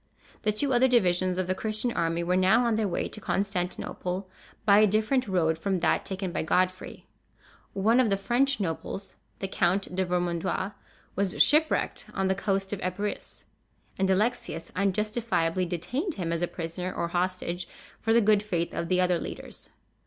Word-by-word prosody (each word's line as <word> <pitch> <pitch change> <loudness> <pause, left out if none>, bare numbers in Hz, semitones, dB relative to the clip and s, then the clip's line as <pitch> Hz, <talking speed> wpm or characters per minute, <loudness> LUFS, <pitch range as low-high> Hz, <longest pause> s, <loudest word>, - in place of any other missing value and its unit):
The 215 - +2
two 265 +6 0
other 245 +2 +5
divisions 185 -6 +2
of 185 - 0
the 185 - 0
Christian 215 +4 -1
army 165 0 0
were 180 +1 +1
now 190 +6 +4
on 235 - +2
their 215 -1 +1
way 175 - -1
to 215 - -7
Constantinople, 185 -1 -2 0.4
by 200 0 +7
a 215 - +6
different 220 +5 +1
road 165 -4 +1
from 190 +1 0
that 165 - +2
taken 190 -1 -3
by - - -1
Godfrey. 185 +3 -1 0.7
One 220 +5 +3
of 250 -4 +4
the 195 - +2
French 245 +6 +1
nobles, 190 +2 -4 0.2
the 195 - -3
Count 185 0 0
de 190 - +1
Vermandois, 180 +2 -1 0.4
was 195 -2 -1
shipwrecked 310 +1 +2
on 195 -1 +1
the - - +4
coast 195 0 -1
of 200 - -4
Epirus, 195 +3 -4 0.5
and 190 0 0
Alexius 190 -5 0
unjustifiably 200 -3 0
detained 250 - -2
him 170 -3 -2
as 165 - -2
a 175 - +1
prisoner 175 +2 -5
or 170 - -2
hostage 180 0 -2 0.3
for 225 - 0
the 235 +1 +5
good 210 -1 +4
faith 175 -5 -2
of 170 - -2
the 185 +1 +2
other 180 -1 +2
leaders. - - -7
190 Hz, 175 wpm, -27 LUFS, 180-215 Hz, 0.7 s, by